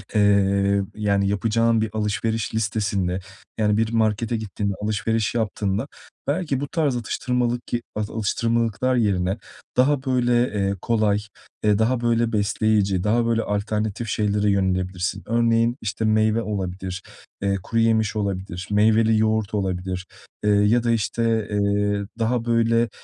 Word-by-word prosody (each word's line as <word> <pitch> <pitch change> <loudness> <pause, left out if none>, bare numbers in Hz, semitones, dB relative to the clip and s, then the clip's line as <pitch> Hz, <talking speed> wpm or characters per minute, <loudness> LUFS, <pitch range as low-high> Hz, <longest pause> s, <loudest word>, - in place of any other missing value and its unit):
eee, 100 -1 +3
yani, 100 -2 +1
yapacağın 115 +3 +2
bir 110 - -1
alışveriş 110 +1 -1
listesinde, 100 -4 -1 0.4
yani, 105 -1 +2
bir 110 0 +1
markete 115 0 +1
gittiğinde 100 -1 -3
alışveriş 110 +1 0
yaptığında 110 0 -1 0.4
belki 145 -2 0
bu 145 - -3
tarz 145 -3 0
atıştırmalık 120 +1 -1 0.3
alıştırmalıklar 115 +3 0
yerine 95 -4 +1 0.4
daha 130 +1 +3
böyle, 125 -2 +1 0.2
eee, 100 -1 0
kolay, 110 -3 +2 0.4
eee, 105 -1 +3
daha 120 +2 +1
böyle, 115 -1 +1
besleyici, 100 -3 +1
daha 115 +3 +2
böyle, 115 -1 +1
alternatif 105 +2 -2
şeylere 105 0 +1
yönelebilirsin. 95 0 -1
Örneğin, 115 +1 +2
işte, 110 +1 -2
meyve 110 +1 +2
olabilir, 95 -3 -4 0.4
eee, 100 0 +1
kuruyemiş 110 0 +1
olabilir, 95 -3 -3
meyveli 110 +1 +4
yoğurt 110 -1 +1
olabilir, 95 -2 -2 0.4
eee, 105 - +2
ya 105 +4 +3
da, 120 - +2
işte, 115 -1 0
eee, 100 0 +1
daha 115 +1 0
böyle, 115 0 +2
110 Hz, 125 wpm, -23 LUFS, 100-115 Hz, 0.4 s, meyveli